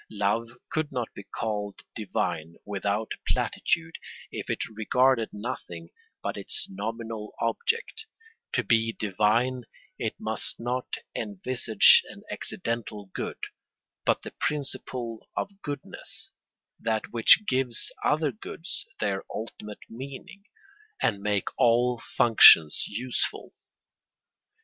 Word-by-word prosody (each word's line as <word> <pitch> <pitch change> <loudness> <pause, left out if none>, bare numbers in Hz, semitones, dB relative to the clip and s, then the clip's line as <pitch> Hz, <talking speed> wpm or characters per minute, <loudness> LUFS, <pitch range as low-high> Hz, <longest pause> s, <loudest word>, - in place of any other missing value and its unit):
Love 110 +3 -1
could 155 -1 -1
not 125 -4 -3
be - - -8
called 105 0 -4
divine 85 -6 -2
without 100 +2 -1 0.2
platitude 160 -1 0 0.3
if - - -5
it - - -1
regarded 120 +2 +3
nothing 95 -7 -6 0.3
but - - -2
its - - -3
nominal 110 +2 -5
object; 450 - -1 0.4
to 125 - +1
be 115 +1 +3
divine 110 +6 +1 0.4
it - - -2
must - - -1
not 125 +2 -2 0.3
envisage 110 +1 +5
an - - -11
accidental 105 -4 -3
good - - -4 0.7
but - - +2
the - - -8
principle 130 -5 -3
of 200 0 -3
goodness, 145 -1 -6 0.5
that 110 -1 -1
which 120 - +7
gives 130 -3 +1
other 150 -1 +2
goods 145 - -6
their 100 -2 0
ultimate 105 -1 -7
meaning, 140 - -9 0.5
and 100 -5 +1
makes 100 -2 0
all 120 0 +4 0.2
functions 85 -9 +8
useful. 120 +4 -2
115 Hz, 105 wpm, -27 LUFS, 105-125 Hz, 0.7 s, functions